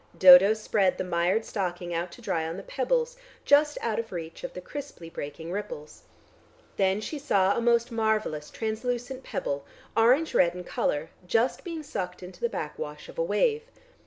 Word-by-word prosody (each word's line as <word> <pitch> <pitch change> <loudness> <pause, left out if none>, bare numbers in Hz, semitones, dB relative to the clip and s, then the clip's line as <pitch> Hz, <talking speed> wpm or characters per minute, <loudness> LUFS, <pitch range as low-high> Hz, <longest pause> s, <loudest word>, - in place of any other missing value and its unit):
Dodo 185 +3 +9
spread 205 -3 +1
the - - -1
mired 180 +5 +1
stocking 175 -3 -3
out 170 +1 -2
to - - -13
dry 160 -1 -1
on 165 +2 -5
the 195 - -7
pebbles, 485 - -1 0.3
just 295 +1 +4
out 225 -2 -1
of 225 -1 -5
reach 165 - -7
of - - -5
the - - -4
crisply 280 - -8
breaking 160 +3 -6
ripples. 165 -6 -6 0.7
Then 195 +1 +2
she 290 +7 -5
saw 200 -8 +2
a - - 0
most 235 +1 +2
marvellous, 215 -9 0
translucent 245 +3 -3
pebble, 140 0 -3 0.3
orange 255 +8 +4
red 175 0 +4
in 180 - -6
colour, 155 -2 -1 0.2
just 230 +6 +1
being 330 -3 -5
sucked 185 -9 -5
into 180 +1 -11
the 475 - +1
backwash 485 0 -6
of - - -9
a - - +3
wave. 470 -2 +2
215 Hz, 175 wpm, -27 LUFS, 175-260 Hz, 0.7 s, Dodo